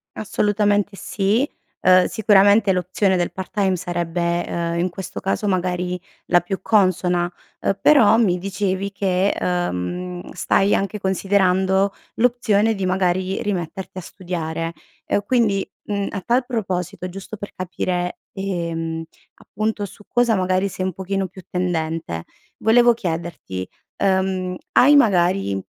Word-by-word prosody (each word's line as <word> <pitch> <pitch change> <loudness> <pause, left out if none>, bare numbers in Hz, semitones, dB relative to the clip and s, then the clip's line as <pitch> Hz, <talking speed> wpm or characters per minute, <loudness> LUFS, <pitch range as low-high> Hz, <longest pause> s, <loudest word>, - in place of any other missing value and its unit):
Assolutamente 205 -1 +1
sì, 205 +8 0 0.3
ehm, 185 0 +6
sicuramente 205 -1 +4
l'opzione 185 +2 +1
del 175 -1 0
part 190 -1 -7
time 195 -3 +2
sarebbe, 175 -1 -1
ehm, 170 0 -2
in 180 +1 +1
questo 190 +2 -7
caso, 195 +2 -1
magari, 180 -1 -1 0.3
la 175 - +4
più 190 +2 -4
consona, 180 -4 +2 0.3
uhm, 195 - 0
però 230 -7 +6
mi 190 -6 +3
dicevi 195 0 -2
che, 195 0 +1
uhm, 180 - -3
stai 195 +1 +2
anche 200 +2 -2
considerando 190 0 +2 0.2
l'opzione 225 -3 +2
di, 195 -3 -3
magari, 185 0 0
rimetterti 185 -1 -4
a - - -6
studiare, 165 -2 -4 0.3
e 205 - 0
quindi, 205 -4 +1
mhmm, 200 -1 -2
a 200 - -5
tal 245 +5 +2
proposito 190 -6 -3
giusto 195 +3 -8
per 205 - -7
capire, 180 -1 -2 0.2
ehm, 165 -4 -3 0.3
appunto, 215 0 -3
su 205 - -13
cosa 240 -1 +2
magari 185 +1 +1
sei 185 - -4
un 185 - -2
pochino 190 +1 -2
più 185 0 -13
tendente, 165 - -2 0.3
volevo 240 +2 +5
chiederti, 165 - -4 0.3
ehm, 190 -1 0 0.2
hai 290 +3 +7
magari 180 - +3
190 Hz, 130 wpm, -21 LUFS, 180-200 Hz, 0.3 s, hai